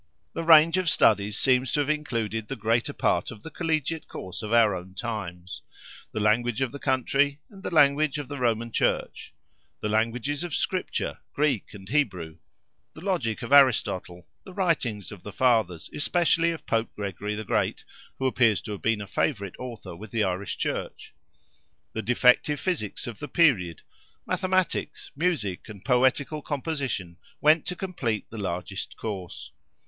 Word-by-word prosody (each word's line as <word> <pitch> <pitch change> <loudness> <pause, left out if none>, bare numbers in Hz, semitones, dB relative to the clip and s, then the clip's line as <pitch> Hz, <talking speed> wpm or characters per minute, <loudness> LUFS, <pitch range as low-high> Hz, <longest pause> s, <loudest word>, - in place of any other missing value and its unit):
The 165 - -3
range 165 +1 +7
of 185 -2 +2
studies 105 -4 +3
seems 130 -1 +3
to - - +2
have 145 - -2
included 115 -8 -2
the 135 - -4
greater 115 +1 +1
part - - +1
of 105 -2 -10
the 160 - -8
collegiate 160 -1 -1
course 90 -1 -7
of 105 -1 -5
our 115 -4 +5
own 95 +1 -9
times. 95 -6 -5 0.5
The - - -3
language 110 +3 +2
of 130 -3 0
the 140 - -8
country, 140 +2 +1
and 195 -2 -13
the - - -3
language 150 -1 +4
of 145 -2 -5
the 145 -1 -6
Roman 115 -1 0
Church; - - -1 0.5
the 105 - -2
languages 120 +8 0
of 175 -4 -3
Scripture—Greek 150 - -2
and 95 -1 -11
Hebrew; 95 - -1 0.6
the 155 - -10
logic 165 - -1
of 120 - -6
Aristotle, 95 -10 +4 0.2
the 190 - -12
writings 140 - 0
of 100 -4 -10
the 105 - -8
Fathers, 110 -8 +2
especially 170 +2 +2
of 165 -1 -5
Pope 115 0 0
Gregory 105 +1 -4
the 110 - -4
Great—who 130 - -3
appears 120 -5 +3
to 105 - -6
have 100 - -5
been 115 -2 +1
a - - -5
favourite 100 - -1
author 120 -8 -7
with 105 +5 -10
the 110 -1 0
Irish 95 +1 -2
Church; - - -4 0.8
the 110 - -2
defective 125 +5 +3
Physics 165 - -2
of 120 -4 -7
the 145 - -5
period; 115 - +2 0.4
Mathematics, 185 -5 -1
Music, 140 - -1
and 100 -1 -11
Poetical 130 +4 +2
composition 135 - -3 0.2
went 155 +1 +4
to 180 - -2
complete 140 - -3
the 110 - -7
largest 95 +1 -4
course. 90 -9 -6
120 Hz, 160 wpm, -26 LUFS, 105-150 Hz, 0.8 s, range